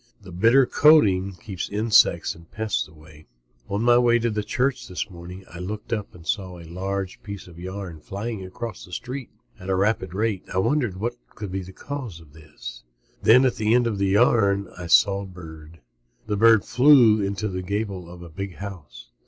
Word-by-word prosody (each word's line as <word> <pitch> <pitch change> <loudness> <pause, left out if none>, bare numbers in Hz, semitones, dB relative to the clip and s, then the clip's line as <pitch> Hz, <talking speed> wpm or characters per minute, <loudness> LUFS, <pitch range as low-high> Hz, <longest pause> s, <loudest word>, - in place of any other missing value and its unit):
The 90 - -13
bitter 115 +9 +4
coating 100 -12 +4
keeps 90 0 -6
insects 105 +2 +3
and 85 0 -17
pests 110 -1 -2
away. 75 0 -17 0.4
On 100 +3 -1
my 120 0 +5
way 120 -1 +4
to 115 0 0
church 130 +4 -1
this 95 +3 -5
morning 90 +2 -10
I 85 - -11
looked 105 +5 -5
up 105 -4 -4
and 85 -2 -14
saw 95 -4 -3
a 85 - -11
long 95 +3 -3 0.2
piece 100 -2 -8
of 85 -1 -14
yarn 95 -2 -7
flying 100 +5 -5
across 110 +5 -7
the 90 - -13
street 130 +5 -5 0.3
at 95 - -8
a 95 - +2
rapid 100 -2 0
rate. 105 -2 -1
I - - -3
wondered 120 -1 +1
what 120 +3 -1 0.2
could 105 -3 -6 0.2
cause 130 - -6
that. 75 -6 -11 0.4
Then 125 +4 +6
at 125 - +1
the 110 - -3
front 110 +2 +4
end 125 -1 +3
of 110 -4 -2
the 100 - +2
yarn 100 -2 +3
I 90 -1 -7
saw 100 +3 +4
a - - -7
bird. 80 -3 -12 0.4
The 105 - -1
bird 110 0 +5
flew 120 -6 +5
to 105 +2 -2
the 95 -2 -4
gable 100 -2 -4
of 90 0 -11
a 85 - -10
big 95 +2 -6
house. 95 -6 -10
100 Hz, 190 wpm, -24 LUFS, 90-115 Hz, 0.4 s, Then